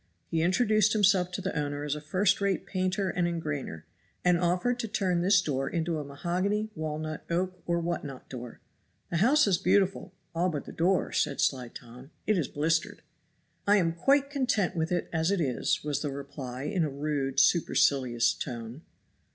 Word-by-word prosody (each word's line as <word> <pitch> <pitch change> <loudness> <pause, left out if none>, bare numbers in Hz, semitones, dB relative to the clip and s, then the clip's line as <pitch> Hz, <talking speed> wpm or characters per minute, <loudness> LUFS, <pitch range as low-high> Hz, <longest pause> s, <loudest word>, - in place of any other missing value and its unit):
He 165 - +1
introduced 215 +4 +3
himself 195 -4 +3
to 195 - -3
the 190 -2 -3
owner 145 -1 -2
as 150 -1 -1
a 150 - -5
first 185 +6 +1
rate 195 -1 0
painter 185 0 -1
and 175 0 0
engrainer, 150 - -4 0.4
and 180 -1 +4
offered 180 +8 +1
to 230 - -2
turn 185 -4 0
this 195 +2 +5
door 135 -4 -1
into 165 -1 -1
a - - -4
mahogany, 185 +9 -2
walnut, 155 0 -4
oak 180 +1 -1
or 170 0 +1
what 170 +1 -2
not 135 -3 -8
door. 125 -2 -8 0.5
"The 170 - 0
house 265 - +5
is 190 -4 +2
beautiful, 195 0 +1 0.2
all 175 +2 +1
but 150 -5 -4
the - - -8
door," 180 +3 +1
said 140 - 0
sly 130 -3 +1
Tom; 125 +3 -12 0.2
"it 215 - +2
is 165 -8 0
blistered." 165 +7 -1 0.6
"I 205 +1 +6
am 165 -4 +1
quite 275 +11 +2
content 250 -11 0
with 160 0 -1
it 175 - 0
as 160 +1 +1
it 200 -1 +1
is," 130 -7 0
was 145 -2 -2
the 150 - -2
reply 135 -2 -6
in 165 +4 0
a 155 - 0
rude, 140 -1 -1
supercilious 130 -6 +3
tone. 120 +1 -6
170 Hz, 185 wpm, -29 LUFS, 145-190 Hz, 0.6 s, I